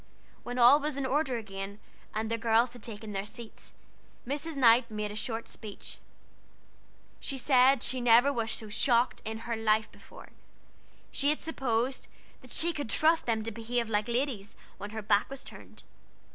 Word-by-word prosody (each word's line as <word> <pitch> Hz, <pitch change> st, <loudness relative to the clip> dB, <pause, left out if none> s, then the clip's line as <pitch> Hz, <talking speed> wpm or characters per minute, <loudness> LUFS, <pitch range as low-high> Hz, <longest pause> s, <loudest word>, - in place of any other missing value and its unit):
When 245 Hz, +1 st, -6 dB
all 250 Hz, +4 st, +7 dB
was 300 Hz, -1 st, -2 dB
in 275 Hz, -, -1 dB
order 265 Hz, -1 st, 0 dB
again, 195 Hz, -2 st, -6 dB, 0.3 s
and 220 Hz, +1 st, -3 dB
the 230 Hz, -, +1 dB
girls 230 Hz, +2 st, +3 dB
had 245 Hz, -, -11 dB
taken 215 Hz, -1 st, -7 dB
their 195 Hz, 0 st, -2 dB
seats, 220 Hz, +2 st, -8 dB, 0.5 s
Mrs. 290 Hz, +3 st, -3 dB
Knight 235 Hz, -1 st, +5 dB
made 210 Hz, -1 st, -3 dB
a -, -, -7 dB
short 225 Hz, +1 st, -3 dB
speech. 210 Hz, -3 st, -8 dB, 1.2 s
She 275 Hz, -, -4 dB
said 260 Hz, -1 st, +4 dB
she 255 Hz, 0 st, -2 dB
never 245 Hz, +4 st, +5 dB
was 230 Hz, -3 st, -1 dB
so 220 Hz, -, -4 dB
shocked 235 Hz, +3 st, +2 dB
in 220 Hz, +1 st, -5 dB
her 235 Hz, -1 st, -1 dB
life 220 Hz, -1 st, +1 dB
before; -, -, -14 dB, 0.8 s
she 285 Hz, -, +1 dB
had 300 Hz, -, +1 dB
supposed 260 Hz, -4 st, -1 dB, 0.3 s
that -, -, -15 dB
she 340 Hz, +1 st, +2 dB
could 290 Hz, -6 st, -4 dB
trust 320 Hz, +3 st, +3 dB
them 220 Hz, -2 st, 0 dB
to 225 Hz, -, -4 dB
behave 230 Hz, +1 st, -2 dB
like 210 Hz, 0 st, 0 dB
ladies 240 Hz, -4 st, -2 dB, 0.2 s
when 205 Hz, +1 st, -6 dB
her 220 Hz, 0 st, -6 dB
back 205 Hz, 0 st, +2 dB
was 275 Hz, 0 st, -8 dB
turned. -, -, -13 dB
235 Hz, 175 wpm, -30 LUFS, 220-265 Hz, 1.2 s, all